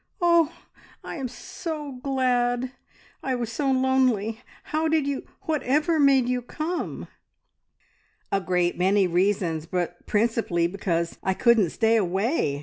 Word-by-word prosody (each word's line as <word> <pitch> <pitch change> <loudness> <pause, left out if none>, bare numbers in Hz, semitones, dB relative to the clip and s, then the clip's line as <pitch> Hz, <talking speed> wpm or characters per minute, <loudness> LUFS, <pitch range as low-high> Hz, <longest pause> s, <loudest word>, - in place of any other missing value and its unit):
"Oh, 340 -3 +4 0.5
I'm 270 -5 -4
so 295 +5 -6
glad! 250 -2 +1 0.5
I 260 -1 -1
was 235 -2 -3
so 275 +4 -1
lonely. 255 -4 +1 0.2
How 310 +1 -1
did 315 -2 +2
you 280 -1 -3 0.2
whatever 305 +2 +1
made 270 -3 +5
you 250 0 0
come?" 310 +8 -4 1.2
"A 195 - +1
great 180 -1 0
many 195 +2 +3
reasons, 175 -3 0
but 175 0 -3
principally 215 -6 +1
because 170 -2 -2
I 190 -1 0
couldn't 230 -6 +4
stay 225 +5 +2
away!" 190 - 0
240 Hz, 125 wpm, -25 LUFS, 190-275 Hz, 1.2 s, made